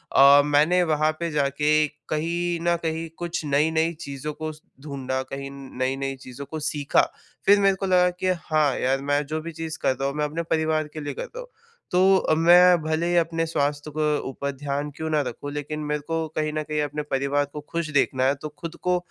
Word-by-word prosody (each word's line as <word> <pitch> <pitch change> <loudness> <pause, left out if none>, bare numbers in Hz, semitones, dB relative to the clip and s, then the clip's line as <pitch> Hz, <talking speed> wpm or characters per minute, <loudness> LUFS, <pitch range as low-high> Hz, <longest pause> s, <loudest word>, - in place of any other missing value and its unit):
अ, 140 +1 +8
मैंने 150 +5 +4
वहाँ 155 -2 +2
पे 170 0 -1
जा 145 -2 +2
के 150 +2 +2 0.2
कहीं 170 +2 -1
न 170 - +4
कहीं 160 0 -2
कुछ 170 -1 -3
नई-नई 160 +3 +2
चीज़ों 140 +2 -5
को 155 +1 -5 0.3
ढूँढ़ा 135 -2 -3
कहीं 135 +1 -6
नई-नई 135 0 -3
चीज़ों 130 +2 -8
को 155 +2 -6
सीखा। 150 -1 +2 0.4
फिर 200 +1 +6
मेरे 195 -1 +4
को 195 - -4
लगा 180 -1 +4
कि 185 - -1 0.2
हाँ, 155 -4 +2
यार 135 +1 +1
मैं 145 +1 0
जो 155 +2 -3
भी 165 +1 -6
चीज़ 160 0 -6
कर - - +2
रहा 135 +2 -2
हूँ 140 - -6
मैं 150 - +1
अपने 160 +3 -3
परिवार 160 -1 0
के 155 - -6
लिए 145 -1 -4
कर - - -5
रहा - - -9
हूँ। - - -8 0.4
तो, 185 -2 +4
मैं 175 +1 +6
भले 160 +2 0
ही 175 - +1
अपने 165 -1 +1
स्वास्थ्य 145 -1 -1
के 150 -1 +2
ऊपर 140 +1 -3
ध्यान 140 +1 -3
क्यों 160 0 -3
ना 155 -1 +2
रखूँ, 145 +4 -6
लेकिन 150 +1 -4
मेरे 150 0 -1
को 165 -1 -1
कहीं 155 0 0
न 155 0 -1
कहीं 150 0 -2
अपने 150 +1 -3
परिवार 140 +2 +1
को 150 - -5
खुश 170 -2 -2
देखना 130 -1 +1
है 135 +2 +3
तो 155 - -5
ख़ुद 165 0 -6
को 180 0 +2
155 Hz, 215 wpm, -24 LUFS, 140-165 Hz, 0.4 s, अ